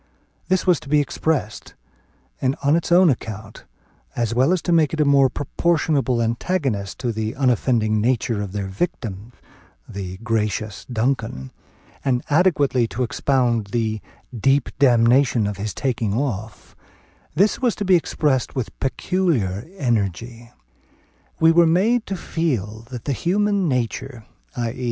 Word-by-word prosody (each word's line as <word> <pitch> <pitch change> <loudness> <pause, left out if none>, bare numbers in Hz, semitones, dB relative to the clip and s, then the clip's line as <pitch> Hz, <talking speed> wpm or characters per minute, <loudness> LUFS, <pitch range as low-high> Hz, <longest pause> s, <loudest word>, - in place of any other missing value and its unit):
This 185 0 +1
was 180 -4 +3
to - - -12
be 150 0 +4
expressed; 145 -5 -2 0.7
and 130 +1 +1
on 140 +2 +4
its 170 +1 -2
own 175 -2 +6
account, 110 -3 -7 0.5
as 115 -1 -1
well 130 +7 +3
as 185 - +2
to 175 - -1
make 160 -2 +3
it - - -8
a 150 - +4
more 140 -2 +5
proportionable 145 -5 0
antagonist 115 - -2
to 125 -2 -1
the 110 0 -3
unoffending 120 -4 +1
nature 115 -2 0
of 100 -2 -5
their 100 0 -3
victim, 100 - -4 0.6
"the 95 -2 -6
gracious 110 -2 -2
Duncan," 115 - -2 0.5
and 125 -2 0
adequately 145 -7 +3
to 115 +5 -3
expound 120 -3 0
"the 110 0 -2 0.3
deep 135 +4 +2
damnation 120 -2 +4
of 100 -1 -3
his 105 +1 -3
taking 115 -2 -1
off," 110 -5 -4 0.6
this 200 - +2
was 245 -4 +1
to 205 - -3
be 185 -1 +5
expressed 150 -5 0
with 130 -4 -4
peculiar 135 - -1
energy. 115 - -2 0.9
We 160 0 +6
were 170 +1 +5
to - - +3
be 160 - +3
made 225 +6 +2
to 195 - -3
feel 115 - -3
that 125 -3 -8
the 140 - 0
human 200 - +1
nature, 125 -1 -3 0.3
_i.e. 120 +1 -3
125 Hz, 145 wpm, -22 LUFS, 110-155 Hz, 0.9 s, own